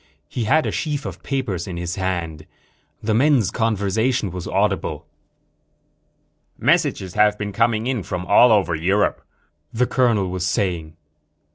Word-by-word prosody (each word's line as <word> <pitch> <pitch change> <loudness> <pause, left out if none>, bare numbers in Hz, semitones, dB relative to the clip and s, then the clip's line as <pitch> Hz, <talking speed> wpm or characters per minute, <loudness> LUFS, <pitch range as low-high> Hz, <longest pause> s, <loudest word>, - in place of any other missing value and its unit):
He 120 - -3
had 155 +7 +3
a - - -1
sheaf 150 -2 -3
of - - -7
papers 110 - -3
in 90 -2 -5
his 85 0 -3
hand. 85 -5 -3 0.6
The 110 0 0
men's 125 - +3
conversation 110 0 0
was 90 -1 -6
audible. - - -1 1.5
"Messages 135 - +1
have 105 0 +3
been 105 -1 -4
coming 115 +1 +1
in 125 -3 -1
from 90 0 -5
all 115 +6 +6
over 100 -5 +3
Europe," 95 +6 +1 0.5
the 125 +2 +1
colonel 115 -8 +1
was 90 -1 -3
saying. 85 -3 -2
105 Hz, 140 wpm, -21 LUFS, 90-120 Hz, 1.5 s, all